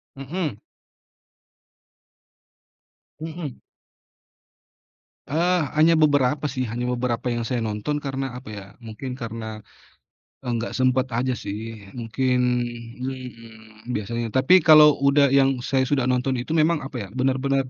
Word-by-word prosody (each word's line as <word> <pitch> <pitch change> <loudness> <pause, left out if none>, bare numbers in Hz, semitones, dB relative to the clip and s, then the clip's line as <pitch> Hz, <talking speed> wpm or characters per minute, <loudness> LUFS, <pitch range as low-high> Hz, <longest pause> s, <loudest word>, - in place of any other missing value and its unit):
Mhm. 140 - -4 2.6
Mhm. 160 -4 -6 1.7
Eee, 175 +4 +2 0.2
hanya 160 +2 +5
beberapa 145 -1 +3
sih, 130 -2 -2
hanya 120 +1 -3
beberapa 120 0 -2
yang 120 -1 -2
saya 120 +1 -2
nonton 110 +7 -2
karena, 135 -2 -4
apa 125 -3 -10
ya, 100 - -7 0.2
mungkin 115 +3 -7
karena, 110 -2 -6 0.8
eee, - - -7
enggak 115 0 -3
sempet 130 0 +2
aja 125 +1 0
sih, 105 0 -7
mungkin 125 +2 0 0.6
mhm, 115 -4 -9
biasanya. 115 +3 -2
Tapi 130 +8 +6
kalau 150 -1 +8
udah 140 0 +4
yang 135 -2 +3
saya 130 0 +1
sudah 135 -2 +1
nonton 125 +1 +1
itu 125 - -8
memang 160 0 +2
apa 135 -1 -7
ya, - - -14
benar-benar 135 +1 +1
130 Hz, 120 wpm, -23 LUFS, 115-140 Hz, 2.6 s, kalau